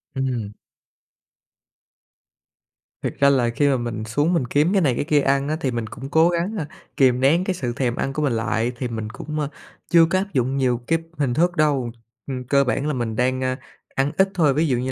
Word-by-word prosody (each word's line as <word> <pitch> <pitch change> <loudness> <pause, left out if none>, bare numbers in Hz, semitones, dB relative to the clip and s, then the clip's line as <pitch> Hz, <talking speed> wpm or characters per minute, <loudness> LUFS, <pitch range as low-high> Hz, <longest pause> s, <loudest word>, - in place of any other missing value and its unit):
Ừm. 125 -6 -2 2.5
Thiệt - - -2
ra 140 0 +6
là 125 -4 +2
khi 145 +5 +1
mà 135 -2 +3
mình 115 -2 -4
xuống 145 +10 +1
mình 135 -7 +1
kiếm 150 +9 +2
cái 195 - +3
này 130 -6 +2
cái 145 - -2
kia 150 -2 +3
ăn 140 +1 +1
á, 155 - 0
thì 130 - 0
mình 115 -2 -3
cũng 135 +5 -8
cố 160 +2 +4
gắng, 175 +5 -1
a, 155 -4 -3 0.3
kìm 125 -2 +4
nén 155 +7 +3
cái 190 - -1
sự 125 -9 -3
thèm 125 -2 -1
ăn 135 - -2
của 150 - -2
mình 140 -5 +1
lại, 115 +1 0
thì 125 - -2
mình 110 -2 -5
cũng, 150 +6 -6
a, 145 - -1 0.4
chưa 170 -1 +6
có 185 +3 0
áp 195 +1 -5
dụng 130 +1 0
nhiều 125 -3 +2
kíp 165 0 +1 0.2
hình 135 -5 0
thức 175 +5 +2
đâu. 140 -6 +1 0.4
Ừm, 130 -2 -4
cơ 140 +2 +3
bản 135 +3 -1
là 150 - 0
mình 115 -3 -2
đang, 130 +2 0
a, 130 0 0 0.4
ăn 135 +2 +1
ít 190 0 +4
thôi, 155 -6 +3
ví 155 +3 +1
dụ 125 -3 +1
như 130 +2 -2
135 Hz, 230 wpm, -22 LUFS, 125-155 Hz, 2.5 s, ra